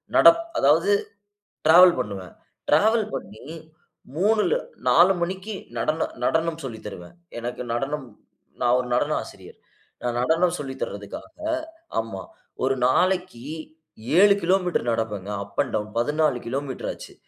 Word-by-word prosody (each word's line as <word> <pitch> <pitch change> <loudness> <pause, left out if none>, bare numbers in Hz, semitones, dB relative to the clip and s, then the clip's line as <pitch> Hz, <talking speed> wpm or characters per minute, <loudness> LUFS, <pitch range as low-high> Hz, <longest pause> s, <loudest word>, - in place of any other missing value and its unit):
நடப் 335 - +7 0.2
அதாவது 160 +8 +4 0.8
டிராவல் 175 0 +8
பண்ணுவேன். 95 -7 -5 0.4
டிராவல் 215 +7 +4
பண்ணி 110 +5 -7 0.7
3ல்ல 215 - +2 0.3
4:00 180 +3 +6
மணிக்கு 190 +4 -3 0.2
நடன 155 +8 0 0.2
நடனம் 160 0 0
சொல்லி 115 -5 -6
தருவேன். 90 - -9 0.2
எனக்கு 120 +1 -5
நடனம் 135 +3 -2 0.6
நான் 120 0 +4
ஒரு 125 - -3
நடன - - +1
ஆசிரியர். - - -13 0.4
நான் 120 -1 -2
நடனம் 170 +5 +2
சொல்லி 135 -2 -5
தர்றதுக்காக 100 0 -7 0.7
ஆமா, 110 -4 -5 0.4
ஒரு 135 +1 +2
நாளைக்கு 180 -4 +1 0.8
7 200 0 +8
kilometre 180 -7 +1
நடப்பேங்க. 105 -3 -3
Up 100 - -10
and 130 - -3
down 105 0 -3
14 150 +1 +1
kilometre 135 +1 -3
ஆச்சு. - - -11
145 Hz, 120 wpm, -24 LUFS, 120-180 Hz, 0.8 s, டிராவல்